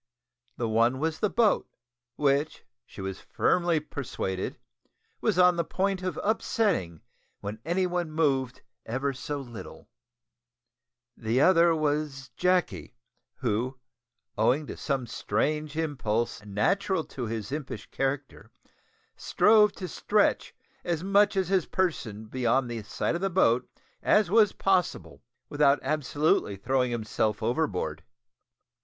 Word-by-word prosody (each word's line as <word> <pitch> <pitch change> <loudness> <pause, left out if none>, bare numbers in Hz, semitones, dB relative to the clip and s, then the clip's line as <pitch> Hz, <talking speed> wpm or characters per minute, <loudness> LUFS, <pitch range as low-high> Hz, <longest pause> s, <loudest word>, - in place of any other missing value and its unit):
The 120 - -1
one 115 +3 +2
was 155 +2 -2
the 210 - +1
boat, 230 -1 +2 0.5
which, 145 +2 0 0.2
she - - -10
was 95 0 -5
firmly 175 -2 +1
persuaded, 110 -10 -4 0.6
was - - +1
on 180 -1 +5
the 170 - +1
point 190 +3 -1
of 185 -4 -3
upsetting 200 - 0 0.4
when 105 +2 -5
any 175 +4 +1
one 175 -2 -2
moved 140 -5 0 0.2
ever 135 +4 -2
so 145 +2 -4
little; 120 -5 -10 1.3
the 115 +2 0
other 170 +1 +5
was 150 -3 -2
Jacky, 180 0 0 0.4
who, 125 +2 -2 0.6
owing 145 +5 +3
to - - -7
some 135 -4 -2
strange 150 +8 -2
impulse 120 -9 -1
natural 165 - 0
to 125 -6 -6
his 110 0 -4
impish 135 -8 -5
character, 135 0 -3 0.7
strove 210 -1 +4
to 185 - -6
stretch 205 +5 +1 0.3
as 170 -1 -2
much 200 +2 +3
of 190 -2 +1
his 190 -3 +1
person 115 - -2
beyond 125 +2 0
the 115 -1 -4
side 105 - -2
of 170 - -3
the 195 - +1
boat 125 -9 +2 0.3
as 210 -4 +3
was 215 -2 +5
possible 190 -3 0 0.3
without 145 -1 +3
absolutely 145 -5 +1
throwing 125 +5 0
himself 110 -2 -1
overboard. 120 - -1
145 Hz, 125 wpm, -27 LUFS, 120-180 Hz, 1.3 s, on